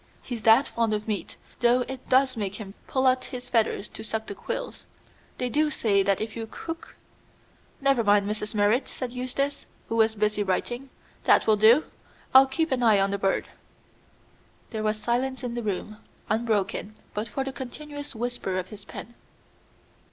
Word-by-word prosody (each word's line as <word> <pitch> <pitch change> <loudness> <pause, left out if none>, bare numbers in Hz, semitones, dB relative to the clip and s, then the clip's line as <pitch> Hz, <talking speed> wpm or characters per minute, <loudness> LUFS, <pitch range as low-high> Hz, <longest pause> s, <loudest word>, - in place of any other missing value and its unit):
He's 240 -3 -5
that 225 +6 +6
fond 230 -2 0
of 210 +1 -5
meat, 210 -3 -3 0.2
though 240 +1 +4
it 260 +1 -6
does 260 0 +4
make 200 -3 -3
him 200 -3 -8
pull 265 0 +1
out 255 0 +3
his 250 -1 -8
feathers 220 -3 +1
to 220 - -7
suck 220 0 -3
the 205 - -6
quills. - - -5 0.5
They 250 - -1
do 300 +5 +2
say 210 -8 +2
that 195 0 +2
if 220 0 -4
you 225 -1 -4
cook 330 +6 -7 0.4
" - - -33
"Never 275 -3 +3
mind, 205 -1 +4
Mrs. 210 +1 -3
Merrit," 210 +5 +3
said 255 -2 -5
Eustace, 255 +3 -2 0.2
who 225 - -1
was 220 -1 +3
busy 210 0 +1
writing. 240 +7 -2 0.4
"That - - +5
will 215 - +5
do; 225 +8 +6 0.5
I'll 265 +1 +9
keep 320 +4 -1
an 255 -1 +1
eye 220 -4 +5
on 195 0 +2
the 200 - -1
bird." 195 -1 +1 1.2
There 220 -2 -3
was 215 0 0
silence 250 +4 -1
in 245 -1 -3
the 240 - -2
room, 210 0 -3 0.3
unbroken 215 -2 0 0.2
but 210 +2 -2
for 270 +6 -2
the 270 0 -5
continuous 290 +2 -7
whisper 235 -5 -2
of 185 0 -3
his 205 -1 -10
pen. 235 - -9
230 Hz, 180 wpm, -26 LUFS, 210-260 Hz, 1.2 s, I'll